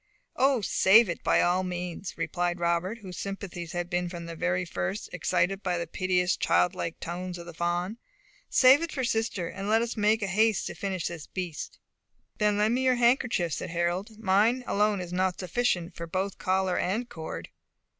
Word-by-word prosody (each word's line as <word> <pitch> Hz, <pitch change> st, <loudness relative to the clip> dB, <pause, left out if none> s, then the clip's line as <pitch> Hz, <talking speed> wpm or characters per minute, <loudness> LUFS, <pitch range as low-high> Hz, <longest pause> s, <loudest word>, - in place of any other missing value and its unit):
"O, 265 Hz, -2 st, +3 dB
save 200 Hz, +2 st, +5 dB
it 170 Hz, -, -4 dB
by -, -, +4 dB
all 180 Hz, +1 st, +2 dB
means," 180 Hz, 0 st, -5 dB
replied 175 Hz, 0 st, -1 dB
Robert, 170 Hz, +5 st, 0 dB
whose 185 Hz, -2 st, -7 dB
sympathies 190 Hz, -4 st, -6 dB
had 175 Hz, 0 st, -2 dB
been 175 Hz, 0 st, -1 dB
from 170 Hz, -1 st, -7 dB
the 180 Hz, +2 st, -1 dB
first 190 Hz, +3 st, -4 dB
excited 180 Hz, +2 st, 0 dB
by 180 Hz, -3 st, -1 dB
the 170 Hz, -, -2 dB
piteous, 180 Hz, +1 st, +1 dB
childlike 180 Hz, -2 st, +1 dB
tones 180 Hz, +1 st, -5 dB
of 170 Hz, -, -9 dB
the 170 Hz, -, -9 dB
fawn. 175 Hz, +6 st, -2 dB, 0.5 s
"Save 265 Hz, +4 st, +6 dB
it 335 Hz, -1 st, -3 dB
for 260 Hz, -, -2 dB
sister, 225 Hz, -7 st, -1 dB
and 195 Hz, +3 st, -5 dB
let 225 Hz, +2 st, +4 dB
us 235 Hz, -, -3 dB
make 215 Hz, 0 st, +2 dB
haste 210 Hz, +3 st, +2 dB
to -, -, -4 dB
finish 190 Hz, -4 st, -3 dB
this 170 Hz, -4 st, -5 dB
beast." 180 Hz, -5 st, -5 dB, 0.6 s
"Then 210 Hz, -1 st, +2 dB
lend 210 Hz, +2 st, +2 dB
me 255 Hz, +2 st, +1 dB
your 255 Hz, -1 st, +4 dB
handkerchief," 235 Hz, -, +2 dB
said -, -, -4 dB
Harold; 175 Hz, +5 st, -2 dB
"mine 220 Hz, +4 st, +2 dB
alone 205 Hz, -1 st, +1 dB
is 175 Hz, 0 st, -7 dB
not 185 Hz, 0 st, 0 dB
sufficient 185 Hz, -2 st, -1 dB
for 170 Hz, -, -6 dB
both 190 Hz, +3 st, -3 dB
collar 185 Hz, -1 st, +1 dB
and 220 Hz, +7 st, -1 dB
cord." 160 Hz, -7 st, -7 dB
185 Hz, 180 wpm, -28 LUFS, 175-215 Hz, 0.6 s, Save